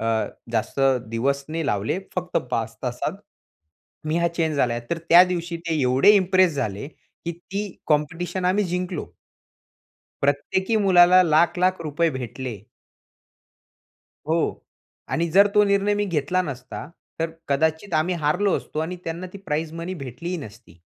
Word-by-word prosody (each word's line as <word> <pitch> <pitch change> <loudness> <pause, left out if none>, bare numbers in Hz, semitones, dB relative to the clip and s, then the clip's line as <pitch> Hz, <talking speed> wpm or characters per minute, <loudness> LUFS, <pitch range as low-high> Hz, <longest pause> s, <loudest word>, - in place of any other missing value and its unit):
अ, - - -3 0.5
जास्त 115 +4 -2 0.3
दिवस 140 +5 -1
नाही 160 -1 -3
लावले 105 - 0 0.2
फक्त 180 0 -2
5 115 -2 -2
तासात 130 +9 -3 0.9
मी 155 - 0
हा 170 0 +2
चेंज 160 -3 -1
झालाय, 120 -3 +1
तर 170 - 0
त्या 170 +2 +7
दिवशी 175 -2 -3
ते 165 -2 -2
एवढे 130 +8 +5
इम्प्रेस 185 -3 +3
झाले 115 -3 -3
की 170 +2 -9
ती 180 +4 -6 0.3
कॉम्पिटिशन 165 +5 -1
आम्ही 195 +3 +2
जिंकलो. 180 - -3 1.1
प्रत्येकी 190 +10 +1
मुलाला 185 -1 +7
लाख-लाख 175 +3 +2
रुपये 160 +2 +1
भेटले. 125 -3 -6 1.7
हो 165 +1 +2 0.7
आणि 170 +1 +1
जर 200 +4 +6
तो 210 - +6
निर्णय 200 +1 +2
मी 205 0 0
घेतला 175 0 0
नसता 135 -2 -7 0.3
तर 165 0 0 0.2
कदाचित 160 +6 0
आम्ही 160 +4 +1
हारलो 170 +5 +1
असतो - - -7
आणि 175 +3 -3
त्यांना 165 +3 -4
ती 200 - -8
प्राइज 160 -4 -3
मनी 170 +3 -5
भेटलीही 165 +4 -5
नसती. 110 - -11
165 Hz, 140 wpm, -23 LUFS, 140-180 Hz, 1.7 s, त्या